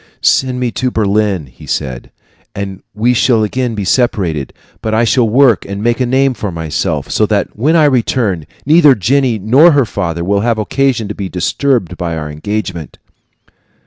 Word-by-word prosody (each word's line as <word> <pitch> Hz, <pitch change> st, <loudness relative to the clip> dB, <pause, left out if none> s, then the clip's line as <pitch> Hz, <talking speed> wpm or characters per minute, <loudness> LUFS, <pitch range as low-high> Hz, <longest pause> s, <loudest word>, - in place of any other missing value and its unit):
"Send 130 Hz, -1 st, +1 dB
me 125 Hz, -2 st, -1 dB
to 130 Hz, +2 st, -1 dB
Berlin," 105 Hz, -6 st, 0 dB
he 65 Hz, -2 st, -16 dB
said, 65 Hz, -2 st, -4 dB, 0.5 s
"and 100 Hz, -2 st, -5 dB
we 120 Hz, +4 st, +2 dB
shall 115 Hz, -2 st, +2 dB
again 120 Hz, +2 st, -2 dB
be 100 Hz, -2 st, -3 dB
separated; 90 Hz, -, 0 dB, 0.3 s
but 110 Hz, 0 st, -1 dB
I 115 Hz, -, +3 dB
shall 120 Hz, 0 st, +2 dB
work 125 Hz, -2 st, +4 dB
and 100 Hz, +1 st, -6 dB
make 120 Hz, +1 st, +1 dB
a 125 Hz, -, 0 dB
name 135 Hz, +1 st, +2 dB
for 105 Hz, -4 st, -5 dB
myself, 80 Hz, -3 st, -3 dB
so -, -, +2 dB
that -, -, -1 dB
when 145 Hz, +9 st, +1 dB
I 160 Hz, -2 st, +5 dB
return 115 Hz, -, 0 dB, 0.2 s
neither 150 Hz, -2 st, +6 dB
Jenny 125 Hz, +3 st, +1 dB
nor 130 Hz, -, +5 dB
her 140 Hz, -3 st, +3 dB
father 85 Hz, -5 st, -3 dB
will 100 Hz, +3 st, +1 dB
have 115 Hz, +1 st, 0 dB
occasion 125 Hz, +1 st, 0 dB
to -, -, -3 dB
be 100 Hz, -2 st, -5 dB
disturbed 90 Hz, -, -1 dB
by 85 Hz, -2 st, -3 dB
our 75 Hz, -1 st, -5 dB
engagement." 90 Hz, 0 st, -5 dB
110 Hz, 175 wpm, -14 LUFS, 95-130 Hz, 0.5 s, neither